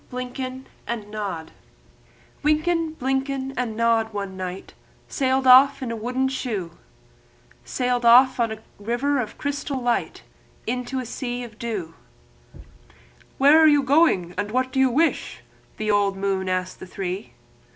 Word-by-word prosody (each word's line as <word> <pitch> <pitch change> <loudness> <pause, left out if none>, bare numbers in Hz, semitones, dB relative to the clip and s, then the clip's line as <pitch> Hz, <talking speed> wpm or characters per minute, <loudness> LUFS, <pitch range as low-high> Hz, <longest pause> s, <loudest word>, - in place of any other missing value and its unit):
DUTCH 250 +1 -6 0.5
LULLABY 210 -7 -5 0.9
Wynken, 315 +2 +1
Blynken, 270 0 -2
and 235 -3 -3
Nod 230 -1 +2
one 200 -2 -5
night 185 0 -6 0.3
Sailed 265 0 0
off 270 +2 +7
in 240 - -3
a - - -3
wooden 250 +4 -1
shoe, 225 -10 -3 0.9
Sailed 245 -1 -1
on 240 -1 +5
a 220 0 -8 0.2
river 240 +7 0
of 220 -4 -4
misty 285 0 -2
light 245 -2 -1 0.4
Into 250 +2 -3
a 255 - -4
sea 245 +1 -4
of 225 -2 -11
dew. 205 -9 -4 1.4
"Where 285 +4 +6
are 320 - +7
you 290 -2 +5
going, 265 - +3
and 205 0 -2
what 255 +3 0
do 265 - -1
you 265 -1 +5
wish?" 320 +7 0 0.4
The 215 0 0
old 200 -1 +2
moon 195 -1 -1
asked 185 0 -2
the 185 - -9
three. 190 +2 -5
245 Hz, 140 wpm, -23 LUFS, 210-265 Hz, 1.4 s, off